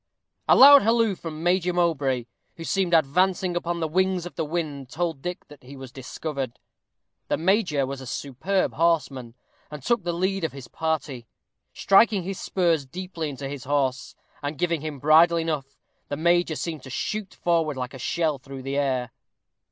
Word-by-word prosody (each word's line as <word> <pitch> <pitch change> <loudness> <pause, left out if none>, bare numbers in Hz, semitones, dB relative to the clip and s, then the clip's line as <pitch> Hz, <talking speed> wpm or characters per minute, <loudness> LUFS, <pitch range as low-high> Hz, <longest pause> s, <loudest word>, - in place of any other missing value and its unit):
A - - +8
loud 280 +1 +10
halloo 225 -1 +2
from 165 -3 -7
Major 180 0 +2
Mowbray, 140 -8 0 0.3
who 165 - -8
seemed 190 +1 0
advancing 180 +4 +2
upon 175 0 -2
the 160 - 0
wings 185 +2 0
of 175 - -8
the 160 - -2
wind, 150 -5 -4
told 165 0 -3
Dick 180 +3 -6
that 145 -2 -15
he 135 +2 -12
was 130 -2 -9
discovered. 135 -1 -5 0.7
The - - 0
major 175 -6 +1
was 135 0 -6
a 130 - -9
superb 150 +11 -1
horseman, 140 -8 0 0.3
and 150 -3 -9
took 235 - +1
the 175 - -1
lead 190 +2 -1
of 160 - -2
his 135 -3 -9
party. 150 -5 -3 0.4
Striking 200 -1 +4
his 190 +1 -5
spurs 170 -5 +1
deeply 170 +2 -5
into 135 0 -6
his 135 -2 -7
horse, 135 -2 -1 0.3
and 145 +1 -4
giving 170 -2 0
him 155 -2 -5
bridle 160 +4 +5
enough, 155 -4 -3 0.3
the 145 - -4
major 170 0 +2
seemed 160 -3 -4
to 130 - -11
shoot 205 - -4
forward 165 -4 0
like 125 +1 -4
a 135 - -9
shell 155 +2 -1
through 135 0 -9
the 135 +1 -3
air. 130 -4 0
160 Hz, 175 wpm, -25 LUFS, 135-175 Hz, 0.7 s, loud